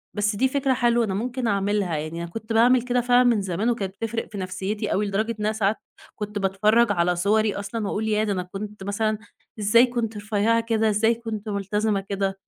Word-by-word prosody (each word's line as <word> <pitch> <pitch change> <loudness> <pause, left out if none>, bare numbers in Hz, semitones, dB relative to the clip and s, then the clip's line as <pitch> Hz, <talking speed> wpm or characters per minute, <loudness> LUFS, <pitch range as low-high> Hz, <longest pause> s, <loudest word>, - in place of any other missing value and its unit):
بس 210 0 0
دي 260 +6 +2
فكرة 270 0 +1
حلوة 240 -1 +2
أنا 195 - -3
ممكن 245 +4 -2
أعمِلها، 200 -4 0
يعني 155 +3 -4
أنا 170 - -6
كنت 225 +1 -5
باعمِل 245 +2 +5
كده 245 0 0
فعلًا 245 +1 +4
من 235 -4 +3
زمان 195 +4 -1
وكانت 200 -5 -2
بتفرِق 225 0 -4
في 205 - -7
نفسيتي 190 +2 -3
أوي، 205 +2 +1
لدرجة 215 +3 -1
إن 210 - -2
أنا 215 - +2
ساعات 215 0 +1 0.4
كنت 210 0 -4
باتفرَّج 210 +4 +3
على 175 -2 +1
صُوَري 210 +3 +2
أصلًا، 210 +2 -4
وأقول 220 +2 -2
ياه! 215 0 +1
ده 210 -2 0
أنا 180 -1 -2
كنت 200 +2 -8
مثلًا 215 +2 -1 0.4
إزاي 215 +4 +5
كنت 235 -3 -3
رفيعة 215 +2 +1
كده؟ 225 -1 +1
إزاي 220 +2 +2
كنت 225 -2 -6
مُلتزِمة 205 +1 0
كده؟ 195 -1 -2
210 Hz, 205 wpm, -24 LUFS, 200-230 Hz, 0.4 s, باعمِل